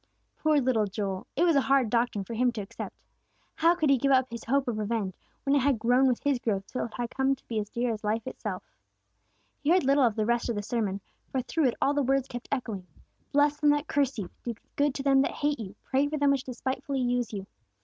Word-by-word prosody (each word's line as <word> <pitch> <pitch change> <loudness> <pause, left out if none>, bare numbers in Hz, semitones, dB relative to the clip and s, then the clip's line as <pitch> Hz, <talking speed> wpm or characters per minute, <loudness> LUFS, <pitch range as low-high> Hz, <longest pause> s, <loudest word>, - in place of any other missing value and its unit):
Poor 310 -1 +2
little 245 -5 +2
Joel, 195 -1 -4
it 325 - +2
was 340 -3 +4
a 280 - +5
hard 270 -5 +2
doctrine 235 -4 +1
for 210 - -7
him 245 +2 +2
to 220 - -4
accept! 195 - -7 0.6
How 335 +2 +4
could 310 -5 +2
he 270 - +4
give 275 +3 +2
up 260 -1 +3
his 235 -1 -7
hope 275 +3 +1
of 225 -3 -1
revenge, 210 -3 -1 0.3
when 275 - +2
it - - +5
had 275 -1 +2
grown 245 +4 +3
with 250 -2 0
his 280 -3 +2
growth 200 -5 -1
till 255 - -3
it 230 - -9
had 240 -1 -3
come 270 0 +1
to 265 - -29
be 225 -2 -1
as 205 -1 -4
dear 235 +1 -1
as 215 - -7
life 215 +2 -1
itself? 210 -7 -5 1.0
He 290 - -1
heard 360 0 +5
little 275 +1 +4
of 230 -4 +3
the 215 - 0
rest 240 +1 +1
of 235 - 0
the 205 - -3
sermon, 205 -4 -2 0.3
for 260 -2 -1
through 310 +2 +1
it 245 - 0
all 280 - +2
the 290 - +1
words 270 0 +1
kept 245 -1 -7
echoing, 220 -9 -3 0.4
"Bless 290 +1 +3
them 295 - +4
that 290 +1 +2
curse 280 -3 0
you! 195 -5 -5
Do 235 -1 -3 0.2
good 285 -1 +1
to 275 - -3
them 270 -1 +5
that - - 0
hate 290 -2 -1
you! 200 -3 -7
Pray 275 +2 +1
for 305 +1 -2
them 285 -1 +3
which 275 -1 0
despitefully 260 +2 -3
use 245 -2 0
you!" 200 -3 -5
250 Hz, 250 wpm, -28 LUFS, 225-275 Hz, 1.0 s, a